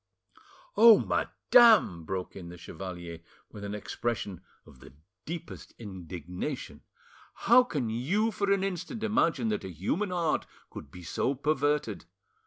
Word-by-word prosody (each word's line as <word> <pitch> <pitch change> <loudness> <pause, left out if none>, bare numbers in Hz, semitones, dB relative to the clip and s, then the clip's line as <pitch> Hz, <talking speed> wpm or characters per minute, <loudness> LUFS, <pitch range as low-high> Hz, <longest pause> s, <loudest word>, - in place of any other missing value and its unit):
"Oh, 230 -1 +9
madame," 220 - +4
broke 95 +1 -4
in 90 -3 -8
the 90 - -10
chevalier, 85 -1 -8 0.3
with 105 - -10
an 100 0 -4
expression 105 -2 -4 0.2
of 65 - -17
the - - -15 0.3
deepest 165 +1 -8
indignation, 90 -4 -6 0.6
"how 245 +2 +8
can 145 - -3
you 190 - 0
for 200 0 -1
an 195 -1 +2
instant 195 +4 -4
imagine 165 - +1
that 105 - -2
a 95 - -6
human 100 - -2
heart 170 -3 0 0.2
could 70 - -9
be 90 +4 -12
so 130 +10 -1
perverted? 150 +1 0
120 Hz, 135 wpm, -29 LUFS, -, 0.6 s, Oh